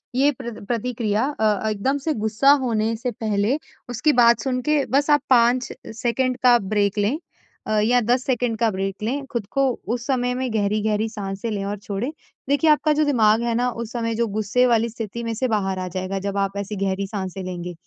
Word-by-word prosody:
ये 280 +3 +4
प्र 255 -3 -7
प्रतिक्रिया 230 -2 -1 0.2
अ, 215 0 +1
एकदम 215 +7 0
से 315 - +1
गुस्सा 220 +5 +3
होने 225 -1 0
से 245 +2 -3
पहले, 215 +3 0 0.3
उसकी 290 +6 +1
बात 235 -2 +5
सुन 255 0 -1
के 300 +1 +1
बस 285 +3 +1
आप 295 -1 +5
5 245 0 +4 0.2
सेकंड 250 +2 0
का 245 -1 +7
ब्रेक 205 0 0
लें 210 +8 +1 0.5
अ, - - -2
या 240 +4 +3
10 245 +3 +1
सेकंड 245 -3 0
का 230 - +3
ब्रेक 195 +1 -4
लें। 275 +6 -2
खुद 235 -6 -2
को 275 0 +2 0.3
उस 240 0 -7
समय 250 -2 +1
में 255 -1 -2
गहरी-गहरी 215 +1 0
साँसे 200 0 -5
लें 205 -2 -2
और 205 +1 -3
छोड़ें। 205 +7 -4 0.4
देखिए, 285 +3 +3
आपका 300 0 +3
जो 305 +1 +2
दिमाग 225 -6 +3
है 235 -1 0
ना 245 +1 +1
उस 230 -1 -6
समय 230 -2 -2
जो 235 +1 +1
गुस्से 215 +4 +1
वाली 230 -1 +2
स्थिति 230 0 -6
में 230 -1 -2
से 255 +3 0
बाहर 195 -4 -1
आ 185 - -3
जाएगा, 185 +2 -3
जब 200 +1 -3
आप 195 0 -1
ऐसी 200 +1 -4
गहरी 195 +1 -1
साँसे 190 -1 -5
लेंगे। 180 -1 -5
225 Hz, 205 wpm, -22 LUFS, 205-250 Hz, 0.5 s, का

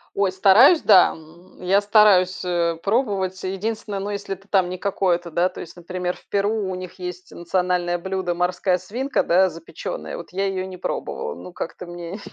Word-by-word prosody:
Ой, 200 -1 +2
стараюсь, 195 - +6
да, 190 -4 +6
м. 165 +4 -17
Я 195 +2 +3
стараюсь, 200 -3 +4
э, 170 -2 0
пробовать. 195 -4 0
Единственное, 200 +2 -3
ну, 200 +1 -4
если 200 -1 -4
это 195 +2 -20
там 190 -3 +2
не 185 - -4
какое-то, 180 -3 -1
да, 175 +3 +2
то 185 - -10
есть, 165 - -9
например, 180 +1 -4
в - - -21
Перу 205 0 0
у - - -3
них 185 0 -8
есть 180 0 -7
национальное 175 0 -1
блюдо- 190 -1 -2
морская 180 +1 +1
свинка, 250 +9 -2
да, 185 +2 +4
запеченная, 165 -1 -7
вот 170 - -9
я 195 +2 -1
ее 190 -1 -2
не 185 -1 -8
пробовала, 465 - -4
ну, 180 - -11
как-то 175 +1 -6
мне 175 +3 -7
185 Hz, 185 wpm, -22 LUFS, 175-200 Hz, -, стараюсь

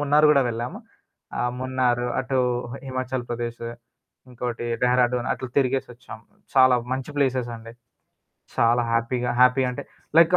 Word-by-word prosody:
మున్నారు 145 +1 +4
గూడా 140 -2 +5
వెళ్ళాము. 120 +1 -4 0.6
ఆహ్, 120 0 0
మున్నారు 125 -2 +1
అటు 130 0 -1 0.3
హ - - -6
హిమాచల్ 130 -1 -3
ప్రదేశు. 120 0 -4 0.6
ఇంకోటి 120 -1 -4 0.2
డెహ్రాడూన్ 125 0 +2
అట్లా 130 - -5
తిరిగేసొచ్చాం. 125 -4 -1 0.4
చాలా 130 -1 +6 0.2
మంచి 130 +2 -3
ప్లేసెసండి. 120 -4 -1 0.8
చాలా 120 +1 +4
హ్యాపీగా 120 +1 0
హ్యాపీ 125 +1 +6
అంటే 125 - -5 0.3
లైకు 170 +2 +7
125 Hz, 120 wpm, -24 LUFS, 120-130 Hz, 0.8 s, లైకు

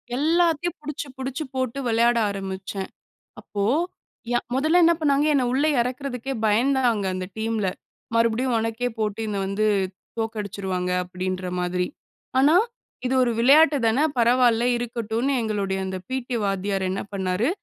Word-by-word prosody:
எல்லாத்தையும் 335 +3 +2
புடிச்சுப் 295 -2 -6
புடிச்சுப் 265 +2 -4
போட்டு, 260 -1 -2
விளையாட 235 +1 +3
ஆரம்பிச்சேன். 195 0 -5 0.5
அப்போ, 200 -1 -4 0.7
யா 240 - +3 0.2
முதல்ல 310 +6 +4
என்ன 335 +1 +6
பண்ணாங்க! 290 -2 +2
என்ன 265 -3 +2
உள்ள 275 +3 +2 0.2
இறக்கறதுக்கே 255 +1 -3
பயந்தாங்க, 235 0 +2
அந்த 185 0 -3
டீம்ல. 220 -2 -1 0.5
"மறுபடியும் 230 +2 +2
உனக்கே 225 +2 -1
போட்டினு 215 -1 -2
வந்து 200 +2 0 0.5
தோக்கடிச்சருவாங்க." 200 -5 -3
அப்பிடீன்ற 185 0 -4
மாரி. 180 0 -1 0.5
ஆனா, 290 +5 +5 0.5
இது 255 - +1
ஒரு 240 - +1
விளையாட்டு 290 +5 +6
தான. 225 +2 +3 0.2
பரவால்ல. 240 0 +4
இருக்கட்டுன்னு. 235 +2 -2
எங்களுடைய 200 -3 -1
அந்த 190 0 -3
பிடி 260 -1 -3
வாத்தியார் 195 -1 -1
என்ன 190 - -2
பண்ணாரு? 190 +5 0
230 Hz, 125 wpm, -24 LUFS, 200-265 Hz, 0.7 s, என்ன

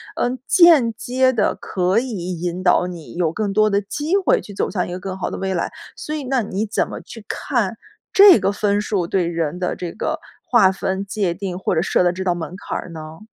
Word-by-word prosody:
嗯， 250 +1 -1
间 320 -11 +6
接 255 +2 +1
地 215 - +1
可 185 +3 +1
以 185 -9 -4
引 175 +1 -3
导 180 -1 +4
你， 170 -3 -9
有 170 -3 +1
更 210 -2 -2
多 215 +1 +3
的 200 0 +1
机 295 - -2
会 425 +5 +3
去 205 - -10
走 - - -1
向 180 -4 -2
一 - - -7
个 180 - -5
更 190 +1 -5
好 185 - -3
的 - - -4
未 190 0 -2
来。 170 - -2 0.2
所 305 - -6
以 295 - -4
那 260 -1 +1
你 205 +2 -2
怎 210 - 0
么 - - -7
去 225 -3 -12
看， - - -1 0.4
这 395 -3 +8
个 195 - +1
分 205 0 0
数 200 -4 -1
对 180 -2 +1
人 165 -1 -2
的 180 - -1
这 175 -2 -5
个 - - -3 0.2
划 210 -6 +4
分 190 0 -2
界 195 -3 -1
定 185 -1 -5
或 - - -1
者 160 - +2
设 180 - +2
的 175 0 +2
这 190 +1 -4
道 180 -2 +1
门 175 +1 -6
槛 - - -5
儿 - - -7
呢？ 160 +2 -9
195 Hz, 250 characters per minute, -20 LUFS, 180-230 Hz, 0.4 s, 这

